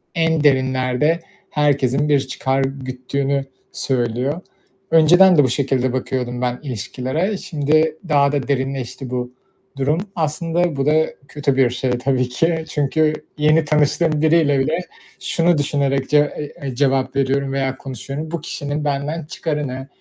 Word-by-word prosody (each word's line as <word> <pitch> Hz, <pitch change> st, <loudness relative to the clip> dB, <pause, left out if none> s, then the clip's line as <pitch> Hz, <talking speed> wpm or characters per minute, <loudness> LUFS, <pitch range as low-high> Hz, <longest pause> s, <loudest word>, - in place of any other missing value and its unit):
en 165 Hz, -2 st, +1 dB
derinlerde 130 Hz, +3 st, +2 dB, 0.3 s
herkesin 145 Hz, -1 st, +1 dB
bir 145 Hz, -2 st, +4 dB
çıkar 135 Hz, 0 st, -1 dB
güttüğünü 135 Hz, +1 st, -2 dB, 0.3 s
söylüyor. 130 Hz, +5 st, -1 dB, 0.5 s
Önceden 175 Hz, +3 st, +6 dB
de 145 Hz, -, +7 dB
bu 130 Hz, -, +2 dB
şekilde 130 Hz, -1 st, 0 dB
bakıyordum, 125 Hz, -1 st, -2 dB
ben 125 Hz, 0 st, -1 dB
ilişkilere. 130 Hz, -, -2 dB
Şimdi, 155 Hz, 0 st, +1 dB
daha 140 Hz, -1 st, +4 dB
da 140 Hz, -4 st, -2 dB
derinleşti, 135 Hz, -1 st, -3 dB
bu 125 Hz, 0 st, -3 dB, 0.4 s
durum. 145 Hz, +4 st, +1 dB, 0.2 s
Aslında, 165 Hz, +1 st, 0 dB
bu 135 Hz, 0 st, -1 dB
da 155 Hz, +1 st, +4 dB, 0.2 s
kötü 140 Hz, -1 st, -1 dB
bir 130 Hz, -2 st, +4 dB
şey 125 Hz, +1 st, -2 dB
tabii 125 Hz, 0 st, 0 dB
ki, 160 Hz, +4 st, 0 dB
çünkü 150 Hz, +2 st, +1 dB, 0.2 s
yeni 155 Hz, +1 st, +3 dB
tanıştığım 150 Hz, +1 st, +2 dB
biriyle 155 Hz, -3 st, +3 dB
bile 155 Hz, +5 st, +1 dB, 0.4 s
şunu 170 Hz, -1 st, +1 dB
düşünerek, 140 Hz, -2 st, 0 dB
ce 150 Hz, -, +4 dB, 0.2 s
eee, 150 Hz, -1 st, -6 dB
eee, 130 Hz, -3 st, -4 dB
cevap 135 Hz, 0 st, +1 dB
veriyorum 135 Hz, 0 st, 0 dB
veya 135 Hz, -1 st, -1 dB
konuşuyorum, 140 Hz, +4 st, -6 dB
bu 170 Hz, -3 st, -3 dB
kişinin 145 Hz, -1 st, -4 dB
benden 145 Hz, +3 st, -2 dB
çıkarı 150 Hz, -3 st, -3 dB
ne? 130 Hz, +1 st, -6 dB
140 Hz, 140 wpm, -20 LUFS, 130-155 Hz, 0.5 s, de